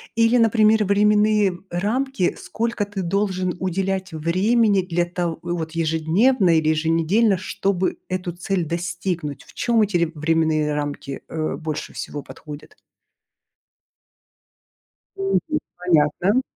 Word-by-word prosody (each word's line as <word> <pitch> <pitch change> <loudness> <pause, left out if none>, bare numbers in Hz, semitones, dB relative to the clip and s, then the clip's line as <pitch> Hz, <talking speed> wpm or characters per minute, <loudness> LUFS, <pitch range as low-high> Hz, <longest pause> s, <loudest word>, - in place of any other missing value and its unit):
Или, 230 +2 +4
например, 220 -1 +4
временные 210 -1 +3
рамки, 215 +4 -1
сколько 230 -2 -2
ты 200 -1 -5
должен 185 0 -1
уделять 190 0 -2
времени 195 +6 +2
для 175 -1 -1
то 175 -1 -3
вот 170 -2 -3
ежедневно 165 +5 +2
или 155 -1 +2
еженедельно, 165 +7 +2
чтобы 185 0 -1
эту 185 -1 -3
цель 180 0 -2
достигнуть? 170 -2 -3
В - - -18
чем 235 -2 +1
эти 205 -3 +2
ре 170 -1 0
временные 155 -1 +1
рамки 145 -1 -4
э 155 -1 -3
больше 155 -2 -5
всего 145 -1 -6
подходят? 150 -1 -11 2.4
Мгм. 390 0 +1 0.4
Понятно. 180 - +2
180 Hz, 110 wpm, -22 LUFS, 165-210 Hz, 2.4 s, Или